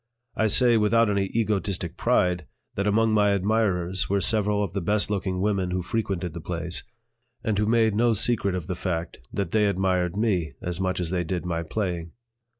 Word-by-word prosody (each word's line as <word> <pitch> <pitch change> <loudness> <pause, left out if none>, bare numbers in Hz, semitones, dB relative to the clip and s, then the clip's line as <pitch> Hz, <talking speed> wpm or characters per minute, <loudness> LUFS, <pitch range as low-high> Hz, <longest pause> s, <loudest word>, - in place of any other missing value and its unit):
I 110 - +2
say, 120 +2 +5
without 110 +1 +3
any 100 -1 +1
egotistic 100 -4 -1
pride, 90 -3 +1 0.3
that 100 +1 -1
among 110 +2 +3
my 105 -1 +4
admirers 95 -3 0
were 100 +1 +2
several 105 0 +1
of 95 -4 -4
the 100 - -2
best 105 +4 +1
looking 95 -2 -1
women 100 -3 0
who 90 0 -2
frequented 95 -4 -2
the 85 - -6
place, 85 +1 -3 0.6
and 110 - 0
who 105 - +1
made 110 -1 +3
no 115 +2 +3
secret 100 -3 +1
of 90 -4 -4
the 90 - -3
fact 85 -2 -3
that 95 -4 -3
they 105 -1 +3
admired 95 -2 0
me 90 -9 0
as 90 +1 -4
much 95 -1 -1
as 90 -2 -2
they 90 -2 0
did 90 +1 -3
my 85 -1 -1
playing. 85 -1 -3
95 Hz, 190 wpm, -25 LUFS, 90-105 Hz, 0.6 s, say